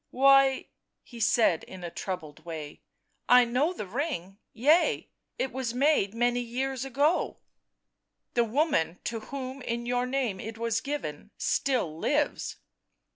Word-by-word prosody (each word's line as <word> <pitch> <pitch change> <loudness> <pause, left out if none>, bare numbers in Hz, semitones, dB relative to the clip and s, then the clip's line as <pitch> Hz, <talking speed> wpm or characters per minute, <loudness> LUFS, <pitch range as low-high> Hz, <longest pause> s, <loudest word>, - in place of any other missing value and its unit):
" - - -55 0.2
Why," 275 -1 +6 0.4
he 240 - -12
said 210 -6 +3
in 185 -1 -10
a 170 - -5
troubled 160 -6 -6
way, 155 -3 -7 0.2
" - - -45
I 250 0 +8
know 255 +8 +1
the 340 - -5
ring 205 - -3
— - - -54 0.2
yea, 325 +4 +4 0.3
it 260 - -1
was 250 -2 -3
made 260 -7 +2
many 240 +1 +2
years 255 +2 -2
ago 285 +6 +1 0.3
" - - -55
" - - -55
The 240 - +3
woman 230 - +1
to 230 -1 -3
whom 265 +3 -6
in 235 -1 -3
your 245 +1 0
name 250 -7 -1
it 225 +2 -6
was 230 -1 0
given 220 - -5
still 245 - 0
lives." 295 - 0
245 Hz, 160 wpm, -28 LUFS, 205-270 Hz, 0.4 s, I